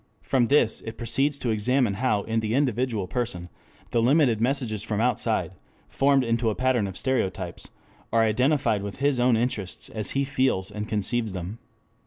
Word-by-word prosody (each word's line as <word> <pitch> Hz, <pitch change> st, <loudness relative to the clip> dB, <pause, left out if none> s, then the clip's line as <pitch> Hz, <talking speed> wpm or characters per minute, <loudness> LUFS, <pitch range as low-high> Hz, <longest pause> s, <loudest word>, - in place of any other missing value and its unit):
From 125 Hz, -3 st, +2 dB
this 135 Hz, -5 st, +3 dB
it 115 Hz, 0 st, -8 dB
proceeds 135 Hz, +5 st, 0 dB
to 120 Hz, -4 st, -1 dB
examine 115 Hz, +1 st, +1 dB
how 105 Hz, -1 st, 0 dB
in 115 Hz, 0 st, -1 dB
the 110 Hz, +1 st, -1 dB
individual 125 Hz, -6 st, 0 dB
person 100 Hz, -8 st, -3 dB, 0.4 s
the 115 Hz, -, +2 dB
limited 125 Hz, -3 st, +3 dB
messages 120 Hz, -4 st, 0 dB
from 105 Hz, -1 st, -2 dB
outside, 120 Hz, -1 st, 0 dB, 0.4 s
formed 135 Hz, -1 st, +3 dB
into 115 Hz, -1 st, +1 dB
a 105 Hz, -, -2 dB
pattern 130 Hz, -5 st, +1 dB
of 95 Hz, -, -7 dB
stereotypes, 95 Hz, -9 st, -2 dB, 0.4 s
are 115 Hz, 0 st, +4 dB
identified 115 Hz, -1 st, +2 dB
with 100 Hz, -1 st, -5 dB
his 140 Hz, -2 st, +1 dB
own 120 Hz, -1 st, +4 dB
interests 95 Hz, -, -3 dB
as 105 Hz, -3 st, -4 dB
he 140 Hz, -, +2 dB
feels 130 Hz, -8 st, 0 dB
and 105 Hz, 0 st, -5 dB
conceives 110 Hz, +1 st, -1 dB
them. 95 Hz, +5 st, -6 dB
115 Hz, 170 wpm, -25 LUFS, 105-130 Hz, 0.4 s, are